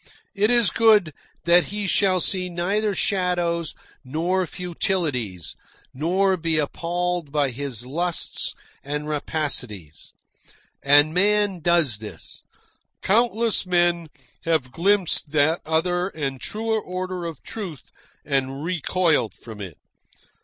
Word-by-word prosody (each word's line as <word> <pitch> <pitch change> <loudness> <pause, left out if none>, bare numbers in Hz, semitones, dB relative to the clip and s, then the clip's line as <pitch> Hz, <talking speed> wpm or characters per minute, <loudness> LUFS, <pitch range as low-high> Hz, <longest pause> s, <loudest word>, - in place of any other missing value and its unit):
It 210 +2 +2
is 240 -3 +4
good 215 -8 +4 0.3
that 170 -1 +5
he 205 +4 -4
shall 190 -1 +2
see 180 +1 +1
neither 195 +4 0
shadows 175 -4 0 0.3
nor 170 +7 -1
futilities, 150 - -2 0.4
nor 185 +7 +1
be 165 -2 +1
appalled 175 +1 -2
by 145 -3 +1
his 125 -2 -5
lusts 170 +6 -1 0.3
and 150 +1 -4
rapacities. 130 - -3 0.7
And 145 +2 +5
man 205 0 +2
does 165 -9 +2
this. 110 -1 -9 0.6
Countless 225 -1 +2
men 175 -2 +2 0.4
have 155 -6 0
glimpsed 175 -3 +1
that 155 +3 +3
other 175 +3 +1
and 140 -8 -4
truer 220 0 -1
order 185 -1 -4
of 165 -4 -7
truth 185 - -7 0.3
and 135 0 -1
recoiled 170 - +1
from 110 -3 -11
it. 90 -6 -8
170 Hz, 110 wpm, -23 LUFS, 145-185 Hz, 0.7 s, that